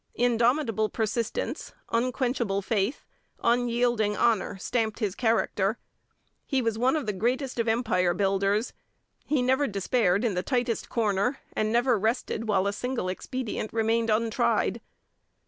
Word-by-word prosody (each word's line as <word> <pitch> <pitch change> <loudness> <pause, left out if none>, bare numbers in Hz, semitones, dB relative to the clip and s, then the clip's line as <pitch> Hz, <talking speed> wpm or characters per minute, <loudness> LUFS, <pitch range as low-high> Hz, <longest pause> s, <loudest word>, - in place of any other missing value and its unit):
Indomitable 235 -2 +2
persistence, 230 - -2 0.2
unquenchable 240 -4 0
faith, 210 +4 -1 0.4
unyielding 235 -3 +2
honour 220 -3 +1
stamped 220 +2 -1
his 210 -5 -1
character. 220 -2 +1 0.7
He 270 - +1
was 230 -3 0
one 250 +6 +2
of 305 - -1
the 210 - -1
greatest 245 +6 -1
of 230 - 0
Empire 185 -7 +1
builders. 195 +3 +1 0.5
He 285 -4 +1
never 265 +3 +2
despaired 200 0 +1
in 225 - +1
the 180 - 0
tightest 245 +1 -1
corner, 220 +2 0 0.2
and 215 0 0
never 240 -1 +3
rested 225 +1 -1
while 195 -3 +2
a 200 - 0
single 250 -4 -2
expedient 220 +3 -4
remained 225 0 +1
untried. 225 +1 +1
230 Hz, 130 wpm, -27 LUFS, 210-245 Hz, 0.7 s, never